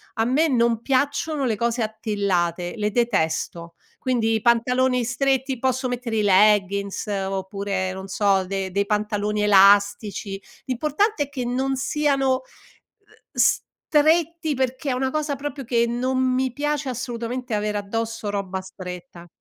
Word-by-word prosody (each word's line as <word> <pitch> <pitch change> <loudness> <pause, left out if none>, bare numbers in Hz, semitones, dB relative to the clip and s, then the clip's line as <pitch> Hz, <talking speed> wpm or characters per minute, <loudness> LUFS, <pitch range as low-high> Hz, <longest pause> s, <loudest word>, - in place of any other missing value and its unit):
a 225 - +1
me 280 +7 +3
non 235 -3 +2
piacciono 285 +3 0
le 225 -4 +1
cose 235 +2 -1
attillate, 200 -6 -1
le 210 -2 -1
detesto. 170 -6 -1 0.2
Quindi 235 -4 +1
i 220 - -1
pantaloni 250 +2 +2
stretti 265 +1 0
posso 260 +1 0
mettere 245 -2 -3
i 215 - +2
leggins 200 0 +3
oppure 195 -1 -2
non 190 0 -7
so, 195 -1 +2
de 195 0 -3
dei 200 +2 0
pantaloni 210 0 -1
elastici, 200 0 +4 0.2
l'importante 305 - 0
è 285 - -10
che 260 -4 -4
non 265 +2 -1
siano, 275 -1 +1
uhm, 260 - -1 0.9
stretti, 320 +1 +1
perché 260 +2 -2
è - - +1
una 260 +1 -1
cosa 300 -1 -1
proprio 280 0 -5
che 235 0 +2
non 250 +2 -1
mi 260 0 +1
piace 295 0 -2
assolutamente 245 0 -4
avere 210 0 -1
addosso 225 +1 -3
roba 190 -2 -3
stretta. 180 -2 -9
230 Hz, 140 wpm, -23 LUFS, 200-260 Hz, 0.9 s, elastici